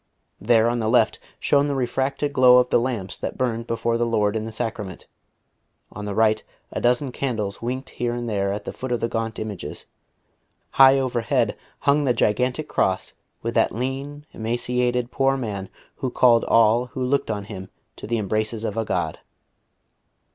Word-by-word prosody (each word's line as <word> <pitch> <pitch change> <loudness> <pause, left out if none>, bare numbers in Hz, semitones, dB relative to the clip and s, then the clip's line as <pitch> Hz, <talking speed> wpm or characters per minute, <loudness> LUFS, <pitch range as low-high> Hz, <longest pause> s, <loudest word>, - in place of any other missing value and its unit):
There 115 +2 +4
on 120 0 0
the 110 -1 0
left 115 -2 +3 0.2
shone 145 0 +3
the 140 - -1
refracted 135 +3 -1
glow 125 -2 +7
of 125 0 +3
the - - +5
lamps 115 -6 -3
that - - -5
burned 115 -2 -1
before 115 0 0
the 120 - +2
Lord 105 -2 +1
in 110 0 -2
the 110 - -6
Sacrament, 110 -4 -5 0.9
on 105 +1 -7
the 100 -1 -4
right 110 -1 +3 0.3
a - - -3
dozen 125 +2 +2
candles 110 -7 -3
winked 130 +3 -4
here 120 0 -2
and 120 0 -4
there 100 -3 0
at 105 - -4
the - - -5
foot 130 -1 -6
of 120 - +1
the - - 0
gaunt 115 -1 -3
images, 110 -3 -6 0.9
high 135 0 +7
overhead 125 -4 0 0.3
hung 145 +1 +3
the 125 -2 +2
gigantic 125 +7 +1
cross 95 0 0 0.3
with - - -2
that - - +2
lean, 135 +4 -4
emaciated 120 +2 -1
Poor 135 0 +2
Man 100 -6 -4 0.3
Who 130 - -2
called 120 -2 +4
all 115 +2 +4
who 130 +1 -4
looked 135 0 0
on 105 -2 -2
Him 95 -2 -8 0.3
to - - -8
the 115 +1 0
embraces 110 +1 -1
of 105 0 -3
a 115 - +1
God. - - -2
120 Hz, 180 wpm, -23 LUFS, 110-130 Hz, 0.9 s, glow